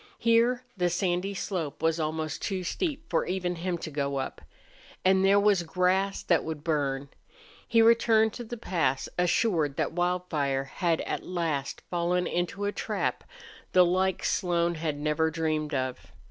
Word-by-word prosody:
Here 235 +2 +3
the 180 -2 +1
sandy 180 +2 -1
slope 165 -7 -4
was 165 0 +2
almost 155 0 -2
too 190 -2 -2
steep 315 - -3
for - - +1
even 180 -1 -2
him 175 +1 -2
to 160 - -7
go 140 -1 -1
up. 135 - -4 0.6
And 190 0 +4
there 200 +1 +5
was 200 -3 +4
grass 185 +3 0
that 170 - +2
would 155 -2 -5
burn. 140 -3 -1 0.6
He 230 -1 +5
returned 225 -1 +4
to 240 - -6
the 240 +1 -7
pass 155 - 0
assured 175 - +2
that - - 0
Wildfire 175 -6 0
had 165 +4 -1
at - - -3
last 160 -6 -2
fallen 175 +1 +1
into 175 +3 -2
a 205 - 0
trap - - -2 0.5
the 180 -1 +7
like 185 +1 +1
Slone 175 -2 +1
had 155 -3 -3
never 150 +2 +1
dreamed 155 -2 -1
of. 130 -1 -3
175 Hz, 160 wpm, -28 LUFS, 155-190 Hz, 0.6 s, the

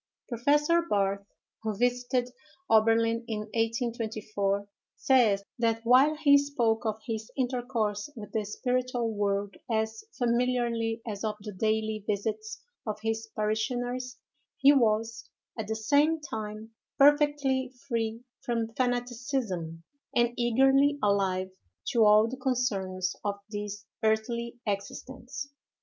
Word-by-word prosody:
Professor 295 +7 +3
Barthe, 200 0 0 0.3
who 215 -2 -3
visited 245 +1 0 0.4
Oberlin 225 +1 +4
in 215 -3 -2
1824, 220 -4 -1 0.3
says, 225 -7 +3 0.2
that 225 -1 +1
while 260 +6 +5
he 285 -2 +6
spoke 240 -6 0
of 215 0 -2
his 220 -1 -4
intercourse 245 -4 -1
with 215 -3 -9
the 220 -2 -1
spiritual 245 +2 -1
world 200 -1 -1
as 220 0 -1
familiarly 235 -2 0
as 205 -1 -4
of 215 -1 -1
the 210 0 -6
daily 215 +1 -1
visits 220 - -3 0.2
of 210 -1 -3
his 225 0 -2
parishioners, 245 +4 -2 0.4
he 280 +1 +7
was 225 -3 +1 0.3
at 220 -3 -4
the 220 - -1
same 290 +8 +3
time 220 -5 -6 0.3
perfectly 285 -2 +4 0.2
free 230 -2 -2 0.2
from 230 -2 -2
fanaticism, 245 - -2 0.3
and 240 0 +3
eagerly 270 +4 +4
alive 190 -2 +1 0.3
to 235 -5 +3
all 210 +1 +6
the 255 +3 -5
concerns 200 -8 -1
of 205 -1 -1 0.2
this 205 0 -5 0.2
earthly 235 +2 0
existence. 255 +7 -5
230 Hz, 115 wpm, -29 LUFS, 215-250 Hz, 0.4 s, he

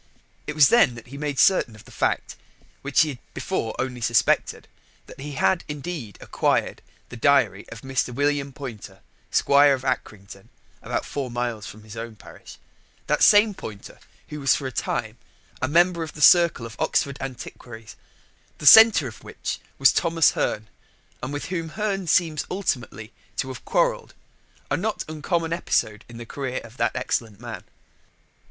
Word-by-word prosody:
It - - -4
was 150 -3 +6
then 235 - +4
that 115 0 -12
he 140 - -9
made 145 -2 -3
certain 130 - +3
of 110 - -16
the - - -16
fact, - - -1 0.5
which 140 +3 +2
he 160 - +2
had 130 -4 -7 0.2
before 110 - -3
only 125 -2 -3
suspected, 115 0 +1 0.4
that - - -14
he 145 +1 -7
had 170 +5 +1
indeed 150 - -6
acquired - - -1 0.3
the - - -9
diary 115 -6 +2
of 115 -2 -10
Mr. 135 -1 -1
William 140 +1 0
Poynter, 115 -8 -9 0.3
Squire 140 0 +4
of 130 - -10
Acrington 100 -6 -5 0.3
(about - - -3
four 140 -3 -4
miles 120 -5 -3
from 110 +3 -11
his 110 +1 -11
own 115 0 -7
parish) 100 - -14 0.5
that - - 0
same 210 +1 +6
Poynter 105 - -10 0.3
who 150 0 -6
was 135 -2 +3
for 140 - -5
a 130 - -3
time - - -3 0.4
a 130 - +1
member 170 +3 +3
of 160 -2 -5
the - - -11
circle 170 -9 +6
of 115 -1 -9
Oxford 140 0 0
antiquaries, 120 -3 -9 0.6
the - - -8
centre 220 -5 +9
of 110 - -11
which - - -5 0.2
was 135 - +5
Thomas 165 -4 +3
Hearne, 110 0 -2 0.5
and 125 - -5
with 145 0 -4
whom 165 -2 -3
Hearne 195 0 -3
seems 155 -2 +2
ultimately 125 - -3 0.2
to 130 - -2
have 130 - -9
quarrelled - - 0 0.6
a - - +3
not 215 +4 -2
uncommon 165 +2 -2
episode 110 - -1
in 120 - -10
the 120 - -8
career 130 +1 -4
of 115 +2 -14
that - - 0
excellent 110 -4 -3
man. 120 -1 -8
135 Hz, 170 wpm, -24 LUFS, 115-155 Hz, 0.6 s, centre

